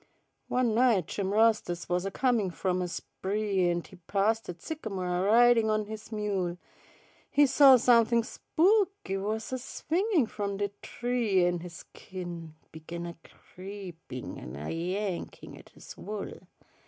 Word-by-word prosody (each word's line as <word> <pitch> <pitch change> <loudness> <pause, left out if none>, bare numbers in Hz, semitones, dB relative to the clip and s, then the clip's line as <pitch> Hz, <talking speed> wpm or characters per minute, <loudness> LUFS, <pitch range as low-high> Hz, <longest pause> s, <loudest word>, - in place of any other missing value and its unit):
One 250 -3 +1
night 230 -6 +3
Jim 195 +3 -3
Rastus 215 -5 +2
wus 180 +1 0
a - - 0
comin' 230 -2 +1
from 185 +1 -1
a 180 - -1
spree, 195 +1 -1
An' 175 0 -1
he 185 - -15
passed 200 +6 0
dat 175 - -7
sycamo' 220 - -5
a 180 0 0
ridin' 230 +2 +5
on 215 0 +1
his 220 +1 -9
mule, 195 -5 -2 0.7
He 290 0 +5
saw 270 0 +7
somethin' 235 -1 +4
spooky 380 - +1
wus 215 +4 -3
a 260 - -2
swingin' 335 - 0
from 200 -2 -4
de 200 0 -1
tree, 230 -7 +1
An' 175 0 +1
his 170 0 -9 0.2
skin 175 -4 -8 0.2
began 170 +2 -7
a 170 0 -7
creepin' 180 -9 -9
an' 65 +2 -8
a 75 +2 -5
yankin' 180 +3 -4
at - - -15
his - - -12
wool. 210 -1 -7
205 Hz, 150 wpm, -29 LUFS, 180-230 Hz, 0.7 s, saw